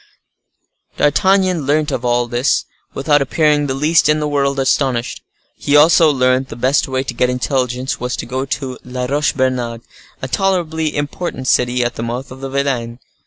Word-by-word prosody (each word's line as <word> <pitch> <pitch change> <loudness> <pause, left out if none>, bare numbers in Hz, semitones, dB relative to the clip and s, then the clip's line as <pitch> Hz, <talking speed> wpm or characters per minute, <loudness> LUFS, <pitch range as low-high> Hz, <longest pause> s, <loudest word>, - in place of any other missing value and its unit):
D'Artagnan 185 0 +2
learnt 150 +1 +1
all 120 0 0
this 120 +2 0 0.3
without 145 +1 +2
appearing 145 +1 +1
the 130 - -2
least 150 +3 +3
in 150 0 +3
the 150 - -1
world 140 -1 0
astonished. 130 -2 0 0.4
He 145 - 0
also 160 +2 +6
learnt 130 -1 +1
the - - -7
best 130 +4 +1
way 130 0 -1
to - - -5
get 125 - +1
intelligence 125 0 -2
was 125 0 -3
to - - -5
go 130 +2 -3
to 135 -2 -4
La 125 0 -4
Roche 145 +3 0
Bernard, 125 -3 -1 0.4
a 130 - -5
tolerably 160 -2 -1
important 145 -2 -4
city 125 0 +2
at 120 0 -3
the - - -4
mouth 120 +3 -5
of 130 +1 -10
the 135 - -5
Vilaine. 130 -4 -2
135 Hz, 170 wpm, -17 LUFS, 125-150 Hz, 0.4 s, also